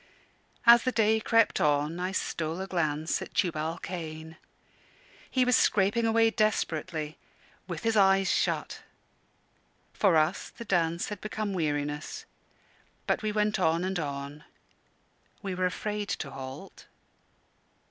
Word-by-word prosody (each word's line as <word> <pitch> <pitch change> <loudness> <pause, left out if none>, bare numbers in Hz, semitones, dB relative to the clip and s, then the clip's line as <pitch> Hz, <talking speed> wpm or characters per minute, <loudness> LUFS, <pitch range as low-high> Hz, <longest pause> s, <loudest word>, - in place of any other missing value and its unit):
As 235 0 +9
the 255 - 0
day 220 -1 +3
crept 230 0 +2
on, 150 +3 +1
I 185 +1 -2
stole 165 -2 -2
a 190 - -3
glance 160 -4 -1
at - - -9
Tubal 165 -3 0
Cain. 160 -2 -6 0.9
He 255 -1 +2
was 250 -1 +4
scraping 210 +4 +3
away 225 0 +4
desperately 160 -7 -1 0.5
with - - -5
his 225 -1 +1
eyes 195 -1 +4
shut. - - -1 1.1
For 190 -6 +3
us 155 +4 +1
the 235 - -10
dance 170 -3 0
had 210 -2 -6
become 215 -1 -3
weariness, 150 -3 -2 0.8
but - - 0
we 215 -1 -1
went 210 -1 +1
on 165 -1 +2
and 190 0 -1
on. 140 0 -5 1.0
We 195 -2 -3
were 185 0 +1
afraid 205 +2 -4
to 140 - -3
halt. 135 +6 -9
185 Hz, 130 wpm, -28 LUFS, 155-210 Hz, 1.1 s, As